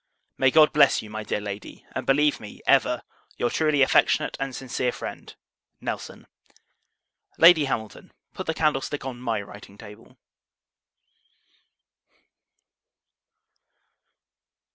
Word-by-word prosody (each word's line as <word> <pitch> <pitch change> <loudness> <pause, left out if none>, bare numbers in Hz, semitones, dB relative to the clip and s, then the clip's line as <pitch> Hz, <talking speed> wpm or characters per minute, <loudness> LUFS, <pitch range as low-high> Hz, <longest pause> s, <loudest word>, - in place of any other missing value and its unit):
May 135 - +3
God 155 +2 +5
bless 140 -6 +4
you, 105 - -11
my 110 0 -5
dear 105 - -2
Lady; 100 0 -8
and - - -5
believe 145 +2 +3
me, 105 - -11
ever, - - +2 0.3
your 120 - -1
truly 155 -3 +2
affectionate - - +2
and 135 -2 -4
sincere 125 -1 -2
friend, - - -8 0.4
NELSON. - - -6 1.1
Lady 165 -3 +7
Hamilton 110 -5 -5 0.2
Put - - -7
the 160 - -1
candlestick 145 -3 -1
on 125 -2 -6
my 115 -4 -2
writing 100 0 -13
table. 110 +4 -14
130 Hz, 110 wpm, -24 LUFS, 110-145 Hz, 1.1 s, Lady